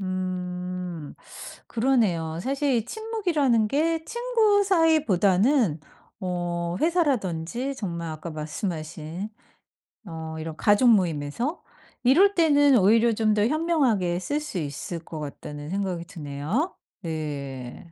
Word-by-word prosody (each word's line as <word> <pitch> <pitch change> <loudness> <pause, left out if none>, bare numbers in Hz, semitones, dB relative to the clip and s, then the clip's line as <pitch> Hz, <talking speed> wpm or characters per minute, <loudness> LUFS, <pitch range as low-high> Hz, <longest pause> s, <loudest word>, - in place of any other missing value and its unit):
음. 180 -3 -4 0.5
그러네요. 205 -10 +1
사실 275 +4 0
이 230 -3 +1
침묵이라는 335 - +1
게 320 +6 +1
친구 455 -3 +2
사이보다는 255 - +3 0.4
어 175 -1 -2
회사라든지 260 - 0
정말 170 -8 -4
아까 155 +2 -6
말씀하신 160 +3 -5 0.8
어 160 -3 -6
이런 160 0 -5
가족 205 +8 +4
모임에서 175 - -1 0.4
이럴 355 +11 +5
때는 290 -5 +5
오히려 225 +4 +4
좀 215 0 +2
더 210 0 +2
현명하게 260 - +1
쓸 285 +11 -1
수 300 -10 -6
있을 150 +3 -5
것 160 -1 -7
같다는 145 0 -7
생각이 185 -2 -2
드네요. 165 - -3 0.3
네. 145 -4 -5
195 Hz, 240 characters per minute, -25 LUFS, -, 0.8 s, 이럴